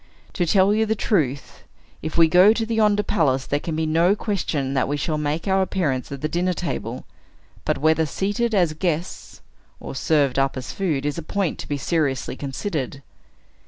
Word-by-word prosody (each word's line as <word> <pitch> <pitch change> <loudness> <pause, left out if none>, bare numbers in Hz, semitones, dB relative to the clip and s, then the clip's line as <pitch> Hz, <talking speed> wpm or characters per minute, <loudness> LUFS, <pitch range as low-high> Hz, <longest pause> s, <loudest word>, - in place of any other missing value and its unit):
To 175 -3 0
tell 195 +3 +4
you 220 +1 +1
the 220 - +1
truth, 145 - -1 0.4
if 160 +1 -4
we 165 -1 +7
go 180 +6 +6
to 225 0 -2
yonder 210 -2 +3
palace, 135 -8 +1
there 145 - -1
can 160 +1 -4
be 160 0 0
no 165 +5 +3
question 165 -11 -2
that 135 - +1
we 145 +1 -1
shall 155 +1 -2
make 150 +4 -2
our 190 0 +3
appearance 155 -10 -1
at 140 -1 -6
the 155 - 0
dinner 180 +3 0
table; 125 -9 -4 0.6
but - - +1
whether 160 +2 +2
seated 210 +7 -1
as 175 -5 +2
guests, 170 +1 -3 0.4
or - - -7
served 140 0 +1
up 135 0 +1
as 130 - -5
food, 155 -8 -1
is 145 +3 -2
a - - -4
point 190 +2 -2
to - - -7
be 145 - -1
seriously 140 -4 -1
considered." 140 - -4
160 Hz, 190 wpm, -23 LUFS, 140-190 Hz, 0.6 s, we